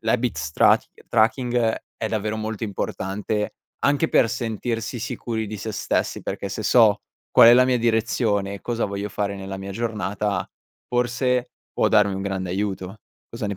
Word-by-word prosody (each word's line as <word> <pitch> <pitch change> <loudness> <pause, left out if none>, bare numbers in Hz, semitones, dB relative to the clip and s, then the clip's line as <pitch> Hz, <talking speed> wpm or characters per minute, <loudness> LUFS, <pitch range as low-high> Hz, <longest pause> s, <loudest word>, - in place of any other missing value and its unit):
l'habits 110 -10 -1
trac - - +4 0.2
tracking 120 +3 +2 0.4
è 110 - -2
davvero 110 0 -2
molto 110 +1 -4
importante, 105 0 -3 0.3
anche 145 +3 +2
per 115 - +4
sentirsi 115 +1 -3
sicuri 115 -2 -3
di 110 - -5
se 105 +2 -5
stessi, - - -1
perché 100 - -4
se 100 +3 -4
so 110 -3 +5 0.3
qual 115 - +8
è - - +9
la 125 +1 +6
mia 125 -1 +2
direzione 110 -3 +1
e 100 - -8
cosa 120 -1 -2
voglio 100 +1 -3
fare 100 0 -2
nella 95 0 -6
mia 95 0 -6
giornata, 105 -3 -2 0.4
forse 125 +1 0 0.2
può - - +2
darmi 100 -1 +4
un 95 - -4
grande 95 -2 -3
aiuto. 95 +1 -3 0.3
Cosa 115 -2 -5
ne 100 - -3
110 Hz, 165 wpm, -23 LUFS, 100-120 Hz, 0.4 s, è